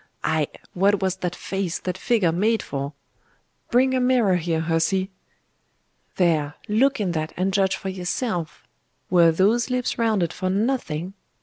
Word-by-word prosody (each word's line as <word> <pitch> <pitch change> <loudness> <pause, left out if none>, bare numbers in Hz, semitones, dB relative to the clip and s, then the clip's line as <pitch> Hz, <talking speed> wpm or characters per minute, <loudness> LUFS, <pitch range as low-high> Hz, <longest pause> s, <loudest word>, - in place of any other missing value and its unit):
Ay 155 -2 +1 0.3
what 200 +2 +3
was 190 -1 -1
that 180 -1 -3
face, 190 -3 -3
that 180 - -4
figure, 215 -9 +1
made 215 +7 +1
for? 140 +1 -4 0.8
Bring 260 +2 +3
a 260 - +2
mirror 245 -7 +3
here, 165 -1 -1
hussy! 165 +4 0 1.0
There, 155 -5 +1
look 255 +6 +2
in 195 -4 0
that 155 -1 -3
and 190 +2 0
judge 195 -1 +2
for 190 - -5
yourself? 180 -1 -3 0.5
Were 170 -2 +6
those 210 +9 +2
lips 250 -1 -1
rounded 210 -7 +1
for 185 0 -2
nothing? 195 - -1
190 Hz, 145 wpm, -23 LUFS, 170-220 Hz, 1.0 s, Were